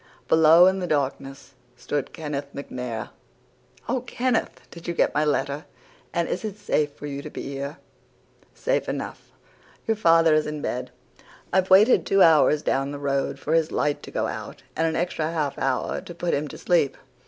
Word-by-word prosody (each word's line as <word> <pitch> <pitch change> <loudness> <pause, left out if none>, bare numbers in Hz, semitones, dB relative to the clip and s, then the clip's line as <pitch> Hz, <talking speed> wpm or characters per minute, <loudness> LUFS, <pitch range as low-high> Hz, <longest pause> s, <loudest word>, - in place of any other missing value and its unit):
Below 160 +2 +7
in 190 +1 +3
the 180 - -3
darkness 135 -2 -3 0.2
stood 140 +2 -3
Kenneth 145 -3 -5
MacNair. 125 -5 -5 0.8
"'Oh, 250 +1 0
Kenneth, 250 -1 -1
did 170 -1 -11
you 170 - -2
get - - +2
my 150 - +2
letter? 145 +1 -1 0.5
And 170 -1 0
is - - -3
it 210 -2 -5
safe 150 -8 0
for 145 - -10
you 140 -1 -5
to 150 - -8
be - - -7
here?' 140 +3 -5 0.8
"'Safe - - -1
enough. - - -6 0.5
Your 225 - +1
father 165 -5 +5
is 155 0 +2
in 150 0 -4
bed. 125 -2 -3 0.6
I've 190 0 +2
waited 205 +6 +6
two 195 -1 +5
hours 150 -2 +5
down 135 +1 0
the 145 - -5
road 140 -1 -1
for 150 +3 -3
his 165 -1 +2
light 145 -1 0
to - - -10
go - - -1
out, - - -6
and 165 - +1
an 160 - -1
extra 165 -2 -1
half 150 -4 -1
hour 130 -2 -1
to 175 - -10
put 175 0 -1
him 150 +2 0
to - - -9
sleep. 170 -6 +1
155 Hz, 185 wpm, -24 LUFS, 140-175 Hz, 0.8 s, Below